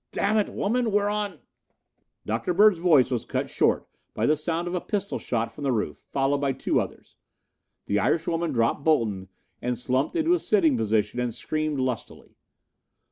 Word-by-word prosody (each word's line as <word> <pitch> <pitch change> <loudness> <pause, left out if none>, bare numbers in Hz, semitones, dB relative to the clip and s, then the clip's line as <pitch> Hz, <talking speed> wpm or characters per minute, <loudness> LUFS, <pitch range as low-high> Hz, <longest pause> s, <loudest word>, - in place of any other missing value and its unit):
"Damn 215 +2 +1
it, 205 - 0
woman, 235 +2 0
we're 205 0 +2
on 205 -5 -3 0.4
" - - -51
Dr. 115 +11 -1
Bird's 205 -2 +6
voice 160 -8 +4
was 120 -3 -1
cut - - -3
short - - +1 0.3
by - - 0
the 155 - +4
sound 165 +3 -2
of 175 - -3
a 180 - -1
pistol 200 -2 -3
shot 115 -2 -2
from 145 - -9
the 135 - +1
roof, 105 -11 -1
followed 140 +1 -1
by 140 -1 0
two - - 0
others. - - -9 0.7
The 100 - +1
Irishwoman 165 +6 0
dropped 115 +2 +1
Bolton 110 -12 +1 0.3
and 125 0 -1
slumped 130 - -1
into 335 +1 +3
a 355 - +2
sitting 170 - +3
position 110 0 0
and 125 -1 -1
screamed 155 +4 -2
lustily. 130 -3 -4
150 Hz, 180 wpm, -26 LUFS, 120-190 Hz, 0.7 s, Bird's